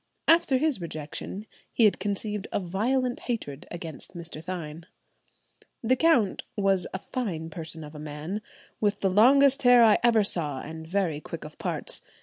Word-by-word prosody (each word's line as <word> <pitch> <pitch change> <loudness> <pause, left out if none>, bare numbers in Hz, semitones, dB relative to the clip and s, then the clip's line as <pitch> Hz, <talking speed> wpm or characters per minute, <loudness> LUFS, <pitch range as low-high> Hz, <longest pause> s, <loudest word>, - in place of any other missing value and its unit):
After 325 -5 +5
his 285 - +1
rejection 165 +5 -6 0.3
he 230 - +4
had 210 - +3
conceived 205 0 -3
a - - 0
violent 240 +8 0
hatred 155 - -5
against 170 +1 -8
Mr. 165 -2 -7
Thynne. 165 -2 -6 1.0
The 250 +3 +3
count 260 - +3
was 195 -3 +2
"a - - -3
fine 180 -7 -4
person 160 0 -6
of 150 0 -10
a 150 - -9
man, 150 +7 -5 0.4
with 205 -1 0
the 195 - +2
longest 270 +7 +5
hair 245 -1 +7
I 215 -2 +6
ever 230 -3 +4
saw, 150 -8 -1
and 160 +1 -8
very 175 -5 -1
quick - - -7
of - - -11
parts. - - -2
195 Hz, 160 wpm, -27 LUFS, 160-235 Hz, 1.0 s, hair